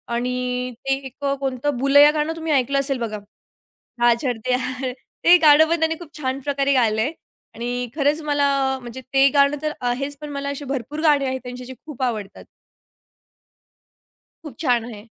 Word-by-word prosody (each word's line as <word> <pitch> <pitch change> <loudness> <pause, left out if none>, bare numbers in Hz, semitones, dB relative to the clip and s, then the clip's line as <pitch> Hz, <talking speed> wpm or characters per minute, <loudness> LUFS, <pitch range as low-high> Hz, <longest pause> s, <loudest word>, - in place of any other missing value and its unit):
आणि 250 +1 -2
ते 270 - +2
एक 265 +2 -11 0.2
कोणतं 270 0 -2
बुलय्या 285 +3 +6
गाणं 305 +1 -1
तुम्ही 320 -1 -3
ऐकलं 275 +1 +2
असेल 275 -1 0
बघा. 220 -2 -3 0.8
हां, 240 0 +6
छड 245 -4 -1
ते 255 - +2
हां 255 +1 -3 0.3
ते 350 +1 +8
गाणं 310 -1 +6
पण 335 0 +1
त्यांनी 320 0 +1
खूप 315 -3 -12
छान 265 -2 -2
प्रकारे 280 0 0
गायलंय 230 0 +2 0.4
आणि 245 +1 -3
खरंच 295 +1 +1
मला 290 -1 +1 0.3
म्हणजे 240 +1 -8
ते 270 0 +6
गाणं 280 0 +4
तर 305 0 -1
आहेच, 275 +4 -2
पण 300 - -6
मला 280 0 -4
अशी 280 0 -5
भरपूर 275 +3 -4
गाणे 295 -3 +3
आहेत 260 0 -2
त्यांचे 250 0 -8
जे 260 - -8
खूप 295 -4 -9
आवडतात. 215 -5 -4 2.0
खूप 300 -6 -9
छान 245 -6 +1
आहे. 215 -4 -9
270 Hz, 170 wpm, -22 LUFS, 250-290 Hz, 2.0 s, ते